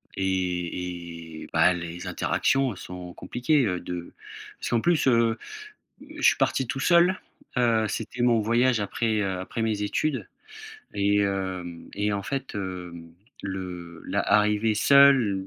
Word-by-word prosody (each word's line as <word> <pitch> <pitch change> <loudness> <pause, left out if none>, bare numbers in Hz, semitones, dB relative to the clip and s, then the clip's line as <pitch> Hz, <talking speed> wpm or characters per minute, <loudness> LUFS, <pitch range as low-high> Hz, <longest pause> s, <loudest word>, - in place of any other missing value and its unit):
et 90 -3 -3
et, - - -10
bah, 80 +2 +5
les 85 0 -6
interactions 135 -4 +1
sont 90 -1 -8
compliquées, 125 - +1
heu, 90 -4 -1
de 90 -1 -7 0.5
parce - - -4
qu'en 115 -2 +1
plus, 170 -4 +2
heu, 115 -2 +3 0.8
je - - -7
suis - - +5
parti 130 - +1
tout 135 - -3
seul, 175 +4 +4 0.4
heu, 115 -3 +3
c'était 115 +3 -4
mon 120 -2 +4
voyage 120 +2 +2
après, 110 +1 0
heu, 95 -2 -1
après 95 +5 -5
mes 110 -2 -1
études 135 +7 -1 0.7
et 100 +1 +2
hem 95 -4 -3
et 105 +1 0
en 100 - -3
fait, 135 +2 -4
heu, 90 -3 -5 0.5
le 90 -3 -6
la - - -1
arrivé 105 +1 +2
seul, 125 -6 +5
100 Hz, 145 wpm, -26 LUFS, 90-120 Hz, 0.8 s, bah